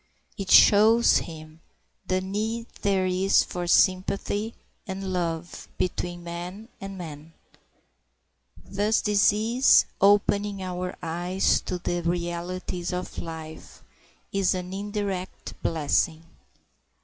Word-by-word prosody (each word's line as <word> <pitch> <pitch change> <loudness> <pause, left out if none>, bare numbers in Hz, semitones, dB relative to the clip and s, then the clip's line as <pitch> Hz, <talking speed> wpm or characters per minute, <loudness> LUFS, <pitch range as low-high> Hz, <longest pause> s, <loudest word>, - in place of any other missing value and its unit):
It 195 -3 -6
shows 220 +3 +6
him 155 0 -10 0.5
the 185 0 +1
need 215 +4 -3 0.2
there 195 -2 +1
is 185 +1 +3
for 175 -1 -5
sympathy 195 +4 +1 0.3
and 190 0 -4
love 170 -1 -3
between 175 -1 -3
man 175 +6 -7
and 195 0 -7
man. 160 -2 -9 1.3
Thus 205 +2 +1
disease, 215 +4 +4 0.2
opening 200 0 +3
our 180 0 -4
eyes 175 +3 +1
to 180 - -2
the 175 0 -2
realities 175 +1 -3
of 180 0 -5
life, 160 -1 -9 0.5
is 195 -1 +1
an 180 0 -5
indirect 200 -2 -4
blessing. 160 +1 0
185 Hz, 100 wpm, -26 LUFS, 175-200 Hz, 1.3 s, shows